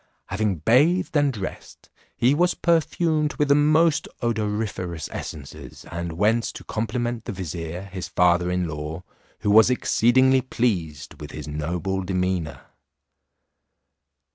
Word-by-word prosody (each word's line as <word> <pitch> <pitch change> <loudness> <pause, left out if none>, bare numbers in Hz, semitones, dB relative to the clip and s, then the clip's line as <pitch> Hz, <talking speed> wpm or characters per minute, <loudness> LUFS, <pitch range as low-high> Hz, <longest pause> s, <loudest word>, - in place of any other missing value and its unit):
Having 105 -3 0
bathed 160 +11 +3
and 145 -2 +3
dressed, 100 -6 -8 0.3
he 125 +3 +4
was 175 +4 +2
perfumed 160 -2 +1
with 145 -1 0
the - - +7
most 155 +2 +3 0.2
odoriferous 105 -7 -2
essences, 70 -3 -8
and 85 0 -4
went 110 +6 +2
to - - -7
compliment 115 +1 -3
the - - -4
vizier, 85 -2 -5
his 95 -2 -6
father 90 0 +2
in 90 -1 0
law, 80 +2 -6 0.4
who 105 - +1
was 110 +2 +7
exceedingly 130 +1 +3
pleased 90 - -2
with - - -7
his - - -8
noble 85 +6 -2
demeanour. 90 -3 -2
105 Hz, 125 wpm, -24 LUFS, 90-130 Hz, 0.4 s, the